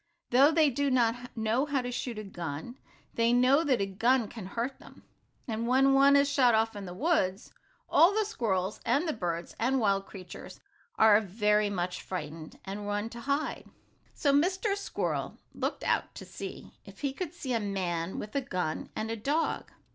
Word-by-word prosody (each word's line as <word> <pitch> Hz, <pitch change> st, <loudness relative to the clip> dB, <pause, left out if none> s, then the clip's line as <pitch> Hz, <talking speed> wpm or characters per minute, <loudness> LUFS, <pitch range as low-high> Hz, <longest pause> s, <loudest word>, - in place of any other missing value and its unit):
Though 265 Hz, +4 st, +7 dB
they 310 Hz, -2 st, +4 dB
do 285 Hz, +3 st, 0 dB
not 245 Hz, -1 st, +1 dB
know 225 Hz, +6 st, +1 dB
how 275 Hz, -3 st, 0 dB
to 245 Hz, -, -4 dB
shoot 245 Hz, -1 st, -4 dB
a 215 Hz, -, -5 dB
gun, 175 Hz, -, -6 dB, 0.3 s
they 230 Hz, 0 st, +2 dB
know 255 Hz, +5 st, +4 dB
that 265 Hz, -5 st, +2 dB
a -, -, +2 dB
gun 230 Hz, +5 st, +2 dB
can 215 Hz, -6 st, -8 dB
hurt 240 Hz, +6 st, -3 dB
them, -, -, -16 dB, 0.4 s
and 230 Hz, 0 st, -2 dB
when 270 Hz, +2 st, +4 dB
one 275 Hz, +1 st, +6 dB
is 280 Hz, 0 st, +5 dB
shot 260 Hz, -5 st, +4 dB
off 225 Hz, 0 st, +1 dB
in 200 Hz, -1 st, -6 dB
the 175 Hz, -, -6 dB
woods, 225 Hz, -, 0 dB, 0.4 s
all 340 Hz, +4 st, +6 dB
the 430 Hz, +1 st, +1 dB
squirrels, 200 Hz, -, -1 dB
and 310 Hz, +5 st, +1 dB
the 315 Hz, -, 0 dB
birds 170 Hz, -5 st, -4 dB
and 260 Hz, +3 st, +2 dB
wild 195 Hz, -3 st, +1 dB
creatures, 185 Hz, -3 st, -10 dB, 0.4 s
are 215 Hz, -1 st, +6 dB
very 210 Hz, +1 st, +1 dB
much 180 Hz, -2 st, -3 dB
frightened, 160 Hz, -3 st, -6 dB
and 205 Hz, +1 st, -5 dB
run 205 Hz, +2 st, -2 dB
to 235 Hz, -, -8 dB
hide. 280 Hz, +5 st, -2 dB, 0.5 s
So 285 Hz, -2 st, +2 dB
Mr. 375 Hz, +7 st, +2 dB
Squirrel 400 Hz, -, -3 dB, 0.2 s
looked -, -, -3 dB
out -, -, 0 dB
to -, -, -8 dB
see -, -, -8 dB
if -, -, -14 dB
he 280 Hz, -2 st, -1 dB
could 345 Hz, +2 st, -5 dB
see 260 Hz, -7 st, -3 dB
a 230 Hz, -, +2 dB
man 185 Hz, -4 st, -2 dB
with 210 Hz, -, -7 dB
a 280 Hz, -, +2 dB
gun 180 Hz, -9 st, -3 dB
and 220 Hz, +1 st, -3 dB
a -, -, -1 dB
dog. 290 Hz, +9 st, -1 dB
230 Hz, 190 wpm, -29 LUFS, 200-275 Hz, 0.5 s, Though